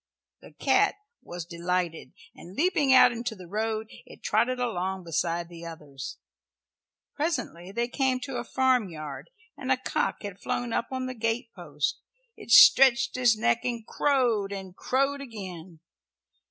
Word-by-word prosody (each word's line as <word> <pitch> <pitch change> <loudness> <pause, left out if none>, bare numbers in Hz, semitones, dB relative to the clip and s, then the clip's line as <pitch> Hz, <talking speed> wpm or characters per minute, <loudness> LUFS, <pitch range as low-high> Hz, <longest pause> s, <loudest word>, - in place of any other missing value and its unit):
The - - -15
cat - - +2 0.3
was 175 -1 -7
delighted, 170 -1 -3 0.2
and 180 +2 -13
leaping 300 - +2
out 260 -1 +8
into 235 -1 -4
the 185 -3 -11
road 220 +3 -2 0.2
it - - -15
trotted 245 +4 +1
along 190 -6 -2
beside 170 +1 -1
the 170 -1 -11
others. 150 -5 -8 1.0
Presently 250 - -3
they 235 +4 -1
came 260 0 0
to 250 0 -5
a 240 - -3
farmyard, 220 - -1 0.3
and 265 -1 -4
a 260 - +4
cock 255 - -2
had 200 -2 -7
flown 240 -2 -2
up 230 - 0
on 260 -1 -3
the 255 - -4
gate 230 0 -2
post. - - -3 0.4
It - - -13
stretched 265 +2 +7
its 245 -3 +3
neck 120 - +1
and 235 -2 -3
crowed, 240 -9 +1
and 190 -2 -7
crowed 275 +5 0
again. 185 - -9
225 Hz, 150 wpm, -27 LUFS, 180-255 Hz, 1.0 s, out